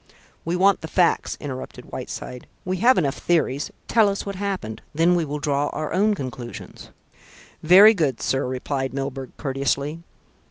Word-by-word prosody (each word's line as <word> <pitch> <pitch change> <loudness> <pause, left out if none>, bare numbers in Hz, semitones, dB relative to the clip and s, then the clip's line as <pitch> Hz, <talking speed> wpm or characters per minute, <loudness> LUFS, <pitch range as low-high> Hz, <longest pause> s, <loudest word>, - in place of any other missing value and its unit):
"We 170 +2 -1
want 195 +2 +3
the 160 - -6
facts," 175 0 +1
interrupted 130 -3 -8
Whiteside. 125 -1 -7 0.2
"We 185 0 -1
have 245 +7 +4
enough 140 -6 0
theories. 150 -5 0 0.2
Tell 220 -3 +4
us 200 - -3
what 200 - -4
happened. 190 - -4
Then 165 +3 +4
we 175 -2 +2
will 150 0 -4
draw 145 0 0
our 155 0 -4
own 210 +2 +3
conclusions." 125 -5 -8 0.7
"Very 195 +7 +8
good, 155 - 0
sir," 135 -1 0
replied 130 +1 -3
Milburgh 135 -1 -5
courteously. 140 +3 -2
150 Hz, 155 wpm, -23 LUFS, 135-185 Hz, 0.7 s, Very